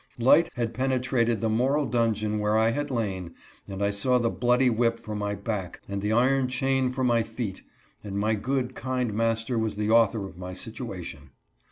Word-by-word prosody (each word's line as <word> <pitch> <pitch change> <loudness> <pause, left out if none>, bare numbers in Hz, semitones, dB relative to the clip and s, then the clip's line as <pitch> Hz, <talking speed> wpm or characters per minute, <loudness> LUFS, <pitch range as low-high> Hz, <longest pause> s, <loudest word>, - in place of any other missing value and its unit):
Light 135 +8 +5
had 115 -1 -2
penetrated 125 -3 0
the 115 - +1
moral 135 +7 +2
dungeon 110 -3 0
where 105 +1 +2
I 110 +1 +3
had 145 +4 -2
lain, 95 -9 -3 0.3
and 100 0 -4
I 100 - +2
sawLthe„ 120 +3 +1
bloody 125 +1 +3
whip 115 -1 +2
for 110 -2 -7
my 105 0 -2
back 100 -2 -4
and 100 0 -3
the 105 +1 -1
iron 130 +3 +3
chain 130 +1 +1
for 130 +1 -3
my 120 -2 +3
feet, 110 -3 -5 0.4
and 100 -1 -5
my 110 +2 +1
good, 130 +4 -1
kind 125 -4 -2
master 115 +2 0
was 110 -2 -1
the 105 +1 -1
author 115 -2 +4
of 90 -2 -11
my 90 0 -6
situation. 95 - -7
115 Hz, 185 wpm, -26 LUFS, 105-125 Hz, 0.4 s, Light